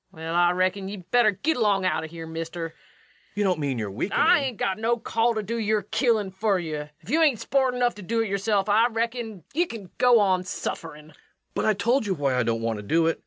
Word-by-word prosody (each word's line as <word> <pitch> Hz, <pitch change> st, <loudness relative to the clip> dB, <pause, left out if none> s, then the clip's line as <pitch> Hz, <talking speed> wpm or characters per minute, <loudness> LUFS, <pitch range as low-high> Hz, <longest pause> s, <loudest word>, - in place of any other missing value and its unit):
LUKE. -, -, -20 dB
Well, 160 Hz, +1 st, -5 dB
I 175 Hz, 0 st, +5 dB
reckon 185 Hz, +2 st, 0 dB
ye 205 Hz, -, -6 dB
better 215 Hz, +5 st, +3 dB
git 290 Hz, -, -1 dB
along 205 Hz, -5 st, +2 dB
out 185 Hz, -, 0 dB
o' -, -, -5 dB
here, 165 Hz, 0 st, -8 dB
mister. 165 Hz, +1 st, -5 dB
REVENUE. -, -, -25 dB, 0.6 s
You 205 Hz, -, 0 dB
don't 185 Hz, -5 st, +1 dB
mean 140 Hz, -4 st, -1 dB
you're 105 Hz, -3 st, -3 dB
weakening? 120 Hz, -, -2 dB
LUKE. 305 Hz, -, +5 dB
I 360 Hz, -, +6 dB
ain't 260 Hz, -6 st, -3 dB
got 190 Hz, +1 st, -1 dB
no 235 Hz, +2 st, +1 dB
call 230 Hz, 0 st, 0 dB
to 215 Hz, -, -2 dB
do 230 Hz, +3 st, -3 dB
your 215 Hz, -1 st, +1 dB
killin' 220 Hz, -2 st, +1 dB
fer 195 Hz, +1 st, +1 dB
you. 155 Hz, -4 st, -4 dB
If -, -, -10 dB
ye 310 Hz, -, +3 dB
hain't 300 Hz, -9 st, +3 dB
sport 265 Hz, -2 st, +1 dB
enough 245 Hz, -1 st, +1 dB
to 205 Hz, -, -11 dB
do 225 Hz, +5 st, -1 dB
it 225 Hz, -, -1 dB
yerself, 200 Hz, 0 st, 0 dB
I 215 Hz, +3 st, +4 dB
reckon 225 Hz, -4 st, -3 dB
ye 340 Hz, +4 st, +1 dB
kin 205 Hz, -, -9 dB
go 245 Hz, -2 st, +6 dB
on 190 Hz, -3 st, +2 dB
sufferin'. 155 Hz, -4 st, -6 dB
REVENUE. -, -, -19 dB, 0.4 s
But -, -, -1 dB
I 215 Hz, -, +4 dB
told 235 Hz, +3 st, +1 dB
you 190 Hz, -, 0 dB
why 140 Hz, -4 st, 0 dB
I 125 Hz, -, +2 dB
don't 115 Hz, -1 st, -1 dB
want 115 Hz, -1 st, -1 dB
to -, -, -8 dB
do 165 Hz, +10 st, +2 dB
it. 165 Hz, -, 0 dB
200 Hz, 260 wpm, -25 LUFS, 165-230 Hz, 0.6 s, I